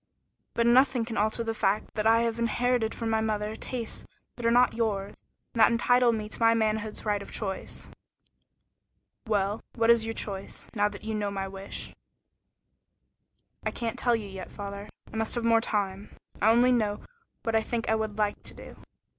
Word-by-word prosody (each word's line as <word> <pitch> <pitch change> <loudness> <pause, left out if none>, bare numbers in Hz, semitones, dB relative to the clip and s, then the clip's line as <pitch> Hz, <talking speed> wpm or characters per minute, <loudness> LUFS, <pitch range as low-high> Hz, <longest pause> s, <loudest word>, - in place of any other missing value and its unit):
But 235 - +2
nothing 250 0 +4
can 225 -1 -5
alter 215 +3 +1
the 225 0 -2
fact 210 -1 0
that 215 0 0
I 225 +1 +5
have 230 0 -1
inherited 235 0 +1
from 225 -1 -2
my 220 0 +2
mother 215 -1 -1
tastes 235 0 -5 0.3
that 235 -1 -2
are - - +5
not 245 +1 +5
yours, 210 -4 -2 0.3
and 230 - -4
that 220 - +7
entitle 245 +1 +4
me 215 -2 -2
to - - -10
my 230 0 +5
manhood's 215 -1 -1
right 205 -1 +1
of 200 - -10
choice." 195 -3 -4 1.4
"Well, 205 0 0
what 230 0 +5
is 235 -1 +4
your 225 0 -3
choice, 195 -2 -6
now 205 -1 +2
that 205 0 -10
you 220 0 -3
know 210 -1 -1
my 195 -1 -3
wish?" 195 0 -7 1.7
"I - - 0
can't 235 +1 -3
tell 240 -1 +3
you 215 -3 -4
yet, 190 -1 -8
father. 200 0 -7 0.2
I - - -4
must 225 +2 0
have 240 - -1
more 230 -1 +4
time. 200 -3 -2 0.3
I 215 - +5
only 240 +2 +5
know 215 -4 +1 0.4
what 225 - -1
I 220 - +4
think 230 +1 -3
I - - +3
would 220 -1 -2
like 210 -1 0
to - - -12
do." - - -11
220 Hz, 190 wpm, -28 LUFS, 205-230 Hz, 1.7 s, that